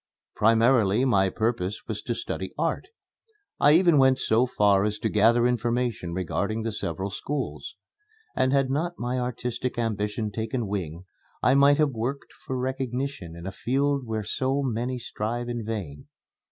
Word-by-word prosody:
Primarily 115 Hz, 0 st, +4 dB
my 95 Hz, -7 st, +3 dB
purpose 110 Hz, -2 st, -2 dB
was 105 Hz, -2 st, -4 dB
to 120 Hz, -, -3 dB
study 95 Hz, -4 st, -5 dB
art. 165 Hz, +1 st, -1 dB, 0.7 s
I 145 Hz, -, +6 dB
even 170 Hz, -3 st, +5 dB
went 130 Hz, -1 st, +5 dB
so 115 Hz, +2 st, +2 dB
far 100 Hz, -4 st, +3 dB
as 105 Hz, 0 st, -1 dB
to 110 Hz, -, -1 dB
gather 115 Hz, +3 st, +4 dB
information 120 Hz, -5 st, 0 dB
regarding 100 Hz, +5 st, -2 dB
the 115 Hz, -, -2 dB
several 95 Hz, -1 st, -3 dB
schools; 140 Hz, +7 st, -4 dB, 0.6 s
and 130 Hz, 0 st, +2 dB
had 135 Hz, -1 st, +2 dB
not 170 Hz, +5 st, -1 dB
my 125 Hz, +1 st, -2 dB
artistic 125 Hz, 0 st, -3 dB
ambition 105 Hz, -1 st, -2 dB
taken 115 Hz, +2 st, -2 dB
wing, 90 Hz, -4 st, -4 dB, 0.4 s
I 130 Hz, -, +5 dB
might 140 Hz, +1 st, +5 dB
have 150 Hz, -2 st, +3 dB
worked 125 Hz, +4 st, -4 dB
for 130 Hz, -, -2 dB
recognition 130 Hz, -7 st, -3 dB
in 85 Hz, 0 st, -9 dB
a 95 Hz, -, -3 dB
field 135 Hz, +5 st, 0 dB
where 110 Hz, -1 st, -2 dB
so 130 Hz, +6 st, -1 dB
many 125 Hz, 0 st, -2 dB
strive 120 Hz, +1 st, -4 dB
in 120 Hz, -1 st, -3 dB
vain. 100 Hz, -10 st, -5 dB
120 Hz, 155 wpm, -26 LUFS, 105-130 Hz, 0.7 s, I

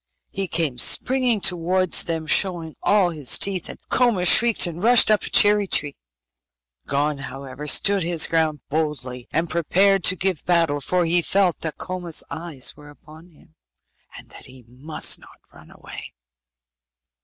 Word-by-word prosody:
He 195 Hz, 0 st, -4 dB
came 160 Hz, -7 st, -2 dB
springing 250 Hz, -, +1 dB
towards 180 Hz, +1 st, +1 dB
them 165 Hz, -1 st, -4 dB
showing 170 Hz, -2 st, 0 dB
all 200 Hz, -4 st, +2 dB
his 145 Hz, -8 st, +1 dB
teeth, 190 Hz, -3 st, -1 dB
and -, -, -9 dB
Koma 235 Hz, -8 st, +1 dB
shrieked, 230 Hz, +5 st, +5 dB
and 170 Hz, 0 st, -6 dB
rushed 235 Hz, 0 st, +5 dB
up 210 Hz, -, +2 dB
a -, -, -4 dB
cherry 205 Hz, -1 st, +4 dB
tree. 145 Hz, -5 st, 0 dB, 0.9 s
Gon, 145 Hz, +1 st, -1 dB
however, 135 Hz, +1 st, -9 dB
stood 200 Hz, +6 st, +2 dB
his 165 Hz, -1 st, +1 dB
ground 160 Hz, -3 st, -1 dB
boldly, 140 Hz, -5 st, -4 dB
and 165 Hz, +1 st, -1 dB
prepared 190 Hz, +4 st, +1 dB
to 185 Hz, -, +5 dB
give 185 Hz, -3 st, -3 dB
battle, 165 Hz, -5 st, 0 dB
for 180 Hz, +4 st, 0 dB
he 175 Hz, +1 st, +1 dB
felt 190 Hz, 0 st, 0 dB
that 160 Hz, -2 st, -6 dB
Koma's 180 Hz, -3 st, -5 dB
eyes 160 Hz, -6 st, -5 dB
were 150 Hz, 0 st, -15 dB
upon 155 Hz, +3 st, -17 dB
him, 160 Hz, 0 st, -25 dB, 0.6 s
and -, -, -15 dB
that -, -, -14 dB
he 130 Hz, -2 st, -15 dB
must 135 Hz, +6 st, -3 dB
not -, -, -19 dB, 0.2 s
run -, -, -14 dB
away. -, -, -12 dB
170 Hz, 155 wpm, -21 LUFS, 150-190 Hz, 0.9 s, shrieked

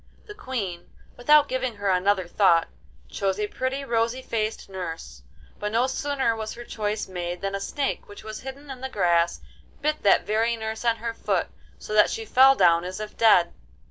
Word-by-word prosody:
The 420 Hz, -, -9 dB
Queen, 220 Hz, -, -5 dB, 0.3 s
without 295 Hz, +4 st, +5 dB
giving 255 Hz, -2 st, -2 dB
her 200 Hz, -1 st, 0 dB
another 185 Hz, 0 st, +1 dB
thought, 175 Hz, -2 st, +3 dB, 0.4 s
chose 195 Hz, -, -2 dB
a 210 Hz, -, +1 dB
pretty 260 Hz, +5 st, -3 dB
rosy 235 Hz, +1 st, 0 dB
faced 220 Hz, -2 st, -3 dB
nurse, 165 Hz, -, -7 dB, 0.4 s
but 210 Hz, 0 st, -3 dB
no 235 Hz, +3 st, +2 dB
sooner 265 Hz, -3 st, -1 dB
was 220 Hz, -1 st, -5 dB
her 240 Hz, -, -8 dB
choice 215 Hz, -2 st, -3 dB
made 175 Hz, -1 st, -5 dB
than 195 Hz, 0 st, -2 dB
a 195 Hz, -, -2 dB
snake, 275 Hz, +8 st, -3 dB
which 205 Hz, -, -12 dB
was 215 Hz, 0 st, -7 dB
hidden 275 Hz, +2 st, -9 dB
in 255 Hz, -1 st, -9 dB
the 265 Hz, -, -4 dB
grass, 170 Hz, -6 st, +1 dB, 0.4 s
bit 305 Hz, +1 st, -1 dB
that 200 Hz, -, +4 dB
very 225 Hz, +2 st, +1 dB
nurse 220 Hz, 0 st, -5 dB
on 230 Hz, -1 st, +3 dB
her 230 Hz, 0 st, -4 dB
foot, -, -, -1 dB, 0.3 s
so -, -, -7 dB
that 210 Hz, -1 st, +5 dB
she 225 Hz, -, -4 dB
fell 265 Hz, +4 st, +6 dB
down 170 Hz, -6 st, +4 dB
as 185 Hz, +2 st, -6 dB
if 215 Hz, 0 st, -7 dB
dead. 185 Hz, -7 st, +5 dB
220 Hz, 190 wpm, -25 LUFS, 190-255 Hz, 0.4 s, fell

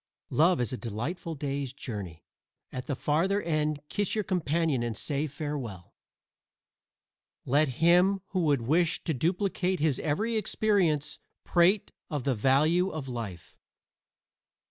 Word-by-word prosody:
Love 170 Hz, +4 st, +4 dB
is 125 Hz, 0 st, -1 dB
a -, -, -2 dB
delightful 140 Hz, -, -4 dB
day's 140 Hz, -2 st, -3 dB
journey. 100 Hz, -, -7 dB, 0.5 s
At 130 Hz, +1 st, -6 dB
the 140 Hz, -, -1 dB
farther 170 Hz, +9 st, +1 dB
end 155 Hz, -4 st, -1 dB
kiss 205 Hz, +4 st, -1 dB
your 215 Hz, -, 0 dB
companion 165 Hz, -7 st, 0 dB
and 120 Hz, -2 st, -3 dB
say 145 Hz, +1 st, -1 dB
farewell. 135 Hz, -, -6 dB, 1.5 s
Let 145 Hz, +4 st, +3 dB, 0.2 s
him 180 Hz, +3 st, +5 dB
who 185 Hz, -, -1 dB
would 145 Hz, -7 st, +2 dB
wish 165 Hz, +7 st, +2 dB
to 160 Hz, -, 0 dB
duplicate 180 Hz, -, 0 dB
his 150 Hz, -4 st, +1 dB
every 215 Hz, +10 st, 0 dB
experience 185 Hz, -8 st, +1 dB, 0.2 s
prate 185 Hz, +4 st, +3 dB, 0.2 s
of 145 Hz, -6 st, -3 dB
the 135 Hz, -, +1 dB
value 150 Hz, -, +3 dB
of 155 Hz, -6 st, -5 dB
life. 110 Hz, -9 st, -6 dB
155 Hz, 130 wpm, -29 LUFS, 130-180 Hz, 1.5 s, him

